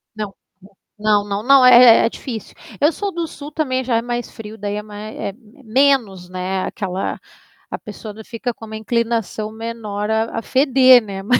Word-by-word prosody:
Não, 210 -2 -5 0.7
não, 210 -1 +2
não, 200 +1 -3
não, 270 +1 +6
é 245 -2 +8
é - - +2
difícil. 230 -3 -8 0.3
Eu 300 - +5
sou 400 +4 -4
do 340 -2 -3
sul 295 0 -10
também 260 -4 -1
já 240 -2 +1
é - - 0
mais 240 0 -4
frio 220 0 -10
daí 205 -1 -4
é 210 - -4
mais 210 +1 -9
é - - -3
m 225 +5 -16
menos, 225 -7 +1
né, 185 +1 -3
aquela 190 -3 -4 0.5
a - - -3
pessoa 210 +1 -9
ainda 220 - -11
fica 245 +2 -4
com 225 - -11
uma 220 0 -8
inclinação 225 -1 -2
menor 220 -2 -5
a 220 +1 0
a - - -6
feder, 260 -1 +5
né, 195 -2 -6
mas 250 +5 +3
225 Hz, 195 wpm, -19 LUFS, 210-255 Hz, 0.7 s, é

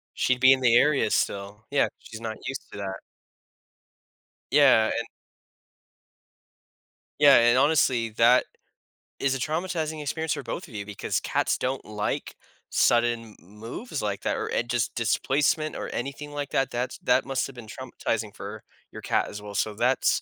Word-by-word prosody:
She'd 130 -1 +1
be 130 +1 +7
in 130 - -1
the 120 -2 +4
area 140 -4 +4
still, 100 +2 -2
yeah. 140 - +3
She's 115 0 -10
not 110 -1 -4
used 135 - -4
to - - -9
that. 95 -1 -4 1.5
Yeah, 135 -6 +6
and 115 0 -2 2.1
Yeah, 145 -2 +8
and, 120 +1 +5
honestly, 130 -5 +3
that 115 +3 +4 0.7
is 135 -1 +1
a 135 - -3
traumatizing 160 0 -2
experience 160 +2 -2
for 145 -3 -5
both 185 +1 -5
of 115 - -13
you 100 -1 -4
because 105 -2 -2
cats - - 0
don't 130 +1 -2
like 105 -1 -3 0.3
sudden 120 -2 +2
m 100 +4 -19
moves 135 - -5
like 100 -1 -2
that - - -1
or - - -2
an 120 - -1
just 120 -2 -1
displacement 140 +7 +1
or - - -5
anything 140 +3 -5
like 145 -1 -5
that. 135 -1 +1
That's 125 +1 -3
that 125 +1 +2
must 135 -1 -1
have 135 - -12
been 120 -2 -10
traumatizing - - -4
for - - -8 0.3
your - - -9
cat - - 0
as 105 0 -8
well, 105 -1 -9
so, 105 +1 0
that's 125 +5 +2
125 Hz, 165 wpm, -26 LUFS, 110-140 Hz, 2.1 s, Yeah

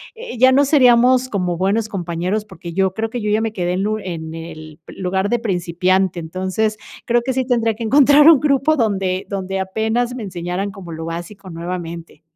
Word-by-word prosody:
eh, 460 - -8
ya 255 +2 +6
no 280 +2 +4
seríamos 255 -2 +4
como 180 -5 -2
buenos 205 +4 0
compañeros 180 +2 -3
porque 180 -4 -10
yo 190 +1 +1
creo 225 +2 -3
que 240 +1 -5
yo 210 - -2
ya 215 +1 +2
me 225 -1 -2
quedé 180 -3 -1
en 190 +3 -1
un 215 0 -1
en 160 -4 -6
el 155 -1 -9
lugar 190 +1 -2
de 240 - +1
principiante. 185 -2 0
Entonces, 185 +6 -2 0.3
creo 240 0 +2
que 260 +2 -2
sí 260 0 -1
tendría 230 -3 +1
que 230 - -6
encontrar 285 +5 +6
un 320 -5 +7
grupo 290 +1 +2
donde 195 -7 -1
donde 195 -1 -3
apenas 220 +6 -1
me 245 - -6
enseñaran 180 +1 -4
como 185 -3 -10
lo 160 0 -6
básico, 175 +4 -7
nuevamente. 170 -2 -7
195 Hz, 195 wpm, -19 LUFS, 180-235 Hz, 0.3 s, un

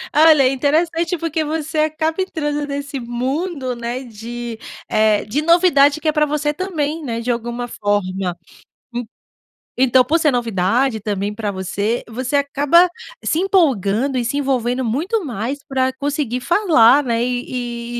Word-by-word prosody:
Olha, 310 -2 +6
é 255 - +4
interessante 325 +6 0
porque 325 -1 -2
você 310 0 -3
acaba 315 +3 0
entrando 295 -5 -2
nesse 280 0 -4
mundo, 260 +3 -3
né. 240 +2 -4
De, 235 0 -7 0.3
eh, 215 -1 +2
de 260 +8 -1
novidade 310 -3 +4
que 315 - -3
é - - +4
para 300 0 +2
você 295 0 -1
também, 320 -3 -3
né. 230 -4 -3
De 245 +1 -1
alguma 240 +1 -3
forma. 195 -5 -2 0.6
En 240 -1 -4 0.7
então, 260 0 +5
por 325 +5 +2
ser 310 -2 +3
novidade, 230 +1 0
também 205 -1 -2
para 210 -2 -3
você, 200 +5 -2
você 255 +4 -2
acaba 290 +5 +4 0.3
se 315 - 0
empolgando 270 - +1
e 245 - 0
se 245 +5 -1
envolvendo 260 -2 0
muito 335 - -1
mais 245 +1 -3
para 260 -1 0
conseguir 280 -3 -2
falar, 295 - +4
né. 235 -2 0
E 240 -1 -3
265 Hz, 150 wpm, -19 LUFS, 235-305 Hz, 0.7 s, Olha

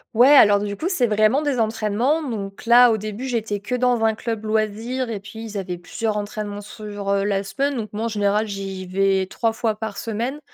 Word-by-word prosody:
Ouais 250 +4 +7
alors 205 -5 +7
du 205 0 -3
coup 345 - -2
c'est 280 -11 +2
vraiment 215 +6 +2
des 275 -5 0
entraînements. 225 +7 0
Donc 200 -2 -6
là, 240 +1 +7
au 220 - +2
début 215 +5 -5
j'étais 220 -4 -2
que 210 +5 -3
dans 245 -2 +1
un 220 -1 +3
club 225 -1 -4
loisir 220 +3 -1
et 205 - -3
puis 200 +2 -12
ils 215 -2 -8
avaient 185 -3 -3
plusieurs 210 +4 -3
entraînements 205 0 -5
sur, 205 -1 -7
heu, 200 0 +2
la 200 -1 0
semaine 275 +8 -1
donc 215 -2 -4
moi 220 +2 -2
en - - +1
général 210 0 +1
j'y 195 -2 -5
vais 190 0 +1
3 225 +3 -1
fois 225 -1 -1
par 215 -2 -5
semaine. 235 +6 -3
215 Hz, 215 wpm, -22 LUFS, 205-235 Hz, -, Ouais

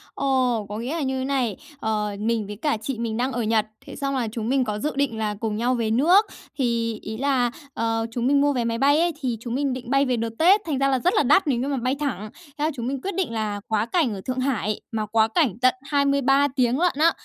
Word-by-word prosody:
Ồ! 255 -5 +1
Có 210 - -4
nghĩa 250 +7 -3
là 330 - -2
như 265 -1 -1
thế 260 - -2
này, 255 -7 0 0.2
ờ, 210 -3 -1
mình 220 -1 -1
với 210 - -6
cả 290 +2 -1
chị 255 +2 -3
mình 230 -1 -2
đang 255 +2 0
ở 245 -2 -2
Nhật, 220 -1 +2 0.2
thế - - -9
xong 275 -1 -2
là 245 -3 0
chúng 225 0 -3
mình 265 0 +2
có 210 -3 -3
dự 300 +7 -1
định 275 -5 0
là 210 -1 -1
cùng 220 -2 -2
nhau 240 +3 +1
về 225 -2 -1
nước. 345 - +5 0.3
Thì 230 -4 0
ý 220 - -6
là, 255 -3 +1 0.2
ờ, 225 0 -1
chúng 240 +1 -1
mình 280 +1 +4
mua 285 0 +3
vé 245 - 0
máy 230 0 -1
bay 285 +4 +4
ấy, 345 +1 +2
thì 245 -4 -1
chúng 235 0 -4
mình 275 -1 0
định 250 -2 -7
bay 275 +1 +3
về 250 -2 0
đợt 230 0 -1
Tết, 380 +6 +6
thành 305 -5 -1
ra 275 +1 +2
là 265 -1 +2
rất 360 +8 +2
là - - +4
đắt 310 +7 +4
nếu 255 -4 +1
như 265 - -2
mà 280 - -1
bay 255 +2 0
thẳng. 215 -8 -3 0.3
Thế 295 - -2
là 315 - +1
chúng 240 -1 -4
mình 270 0 -3
quyết 395 +3 -4
định 370 -10 -1
là 215 -2 -2
quá 215 -1 +1
cảnh 280 - +1
ở 195 - -6
Thượng 255 0 -1
Hải, 235 -6 -1
mà 220 -2 -2
quá 220 +1 +3
cảnh 240 - +1
tận 255 0 +5
23 280 0 +2
tiếng 250 0 +2
lận 355 0 +2
á. 320 +3 +4
250 Hz, 275 wpm, -24 LUFS, 225-280 Hz, 0.3 s, Tết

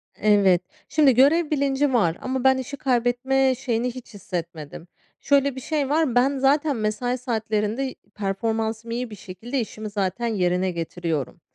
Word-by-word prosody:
Evet. 200 -4 +4 0.3
Şimdi 290 -4 +4
görev 295 +6 +4
bilinci 280 -1 +1
var 175 -9 +2
ama 260 -1 -2
ben 265 0 +5
işi 270 +2 -5
kaybetme 260 +1 +1
şeyini 245 -1 -1
hiç 250 -2 -10
hissetmedim. 170 -4 -6 0.3
Şöyle 280 -1 +2
bir 260 - -6
şey 290 0 -1
var, 300 -5 +1
ben 270 +3 +3
zaten 285 +2 +2
mesai 230 +3 -1
saatlerinde, 225 +1 -2 0.2
performansım 220 +3 -2
iyi 245 +1 -3
bir 210 - -8
şekilde, 210 +7 -5
işimi 215 -2 -5
zaten 200 +3 -2
yerine 185 -3 +1
getiriyorum. 165 -4 -4
240 Hz, 145 wpm, -24 LUFS, 205-270 Hz, 0.3 s, ben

